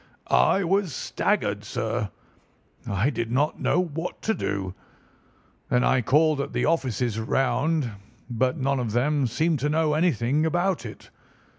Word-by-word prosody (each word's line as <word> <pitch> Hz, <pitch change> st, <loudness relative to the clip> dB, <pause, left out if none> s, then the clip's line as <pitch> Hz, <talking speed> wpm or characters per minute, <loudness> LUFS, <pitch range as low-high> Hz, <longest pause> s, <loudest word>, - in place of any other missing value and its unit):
"I 195 Hz, -, +4 dB
was 185 Hz, -3 st, 0 dB
staggered, -, -, -1 dB
sir. -, -, -2 dB, 0.8 s
I 100 Hz, +8 st, +1 dB
did 115 Hz, -3 st, -3 dB
not 145 Hz, +5 st, +1 dB
know -, -, +2 dB
what 165 Hz, -1 st, -3 dB
to 220 Hz, -, +1 dB
do. 95 Hz, -, -3 dB, 1.0 s
Then 125 Hz, 0 st, +3 dB
I 130 Hz, -1 st, +3 dB
called 150 Hz, +4 st, +3 dB
at 140 Hz, -, -5 dB
the -, -, 0 dB
offices 125 Hz, -, 0 dB
round, 135 Hz, +5 st, +1 dB, 0.4 s
but 125 Hz, +4 st, 0 dB
none 135 Hz, -1 st, 0 dB
of 115 Hz, -4 st, -2 dB
them 140 Hz, +2 st, +2 dB
seemed 155 Hz, +6 st, 0 dB
to 145 Hz, +4 st, 0 dB
know 155 Hz, 0 st, +2 dB
anything 150 Hz, -3 st, +1 dB
about 175 Hz, -4 st, 0 dB
it. 105 Hz, -, -12 dB
140 Hz, 145 wpm, -25 LUFS, 125-160 Hz, 1.0 s, I